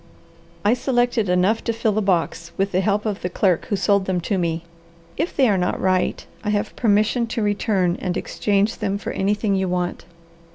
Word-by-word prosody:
"I 210 - +5
selected 245 -4 +1
enough 180 +5 +2
to 230 - 0
fill 225 -1 0
the 215 +1 0
box, 170 -3 -1
with 195 +1 0
the 185 - +2
help 205 +2 0
of 210 -2 -2
the 180 - -2
clerk 180 -1 +1
who 215 - -1
sold 195 +1 +2
them 185 -1 0
to 195 +2 -1
me. 165 -1 -1 0.5
If 320 +5 -2
they 265 -3 +4
are 200 -4 +2
not 180 - -1
right, 185 -1 0 0.2
I 210 - -2
have 210 +1 -1
permission 220 +2 +2
to 225 -1 -2
return 200 -3 +1
and 180 -1 -1
exchange 205 +2 0
them 200 -2 -1
for - - -5
anything 205 +1 0
you 190 -1 0
want." 180 -1 -2
200 Hz, 200 wpm, -22 LUFS, 185-215 Hz, 0.5 s, I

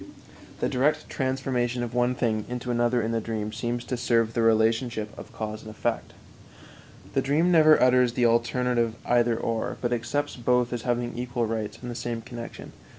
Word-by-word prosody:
The - - +2
direct 140 +4 0
transformation 130 -2 -1
of 120 -1 -5
one 125 +1 +2
thing 110 -4 0
into 125 0 -3
another 120 0 +2
in 110 - -1
the 115 -1 0
dream 110 -1 -4
seems 120 0 -3
to 125 - -2
serve 115 -2 +1
the 120 - 0
relationship 115 0 +1
of - - -10
cause 110 0 -5
and 110 - -10
effect. 110 - -3 1.0
The - - +2
dream 155 +6 +2
never 155 -2 +6
utters 125 -1 +4
the 120 -1 +2
alternative 120 0 +1
"either 120 -1 +3
or," 115 -1 -2
but 120 0 -1
accepts 125 +6 -2
both 125 0 +1
as 120 - -3
having 120 0 -1
equal 120 -1 -2
rights 110 -1 -3
in 125 - -5
the - - -4
same 115 -1 -4
connection. 120 -1 -8
120 Hz, 180 wpm, -26 LUFS, 115-125 Hz, 1.0 s, never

